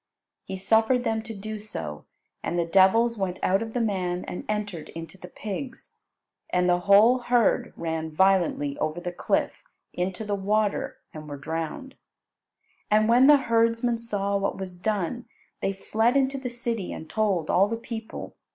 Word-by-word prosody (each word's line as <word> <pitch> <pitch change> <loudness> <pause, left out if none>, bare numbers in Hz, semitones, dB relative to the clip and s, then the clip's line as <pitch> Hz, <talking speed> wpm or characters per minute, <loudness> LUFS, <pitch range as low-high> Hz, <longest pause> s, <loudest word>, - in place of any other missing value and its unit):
He 190 - -5
suffered 225 +5 +3
them 225 -2 0
to 220 0 -8
do 215 +2 -6
so, 80 - -6 0.4
and 175 - -2
the 170 - +1
devils 200 +6 +4
went 185 -2 -2
out 195 +3 +3
of 225 -1 -5
the 245 - 0
man 185 -5 -1
and - - -6
entered 205 -6 -3
into 165 +2 -8
the 180 -1 -11
pigs, 250 +8 -7 0.5
and 180 0 +2
the 175 0 +3
whole 205 +7 +6
herd 245 -2 +2
ran 160 -1 -3
violently 170 -4 +2
over 155 +2 -1
the 175 0 -4
cliff 175 - -1 0.3
into 185 +4 -3
the 205 - -2
water 205 +1 0 0.2
and 155 -1 -9
were 145 - -6
drowned. 165 - -5 1.0
And 215 +1 +4
when 245 +3 +6
the 295 0 +8
herdsmen 230 -1 +1
saw 200 -3 -1
what 200 0 -1
was 185 -2 -7
done, 215 +3 -2 0.3
they 195 - +1
fled 220 +6 +1
into 275 0 +1
the 255 -1 -4
city 235 -5 -3
and 160 - -7
told 195 -7 0
all 195 +2 +4
the 230 +2 -3
people. 225 -1 -7
205 Hz, 170 wpm, -26 LUFS, 180-230 Hz, 1.0 s, the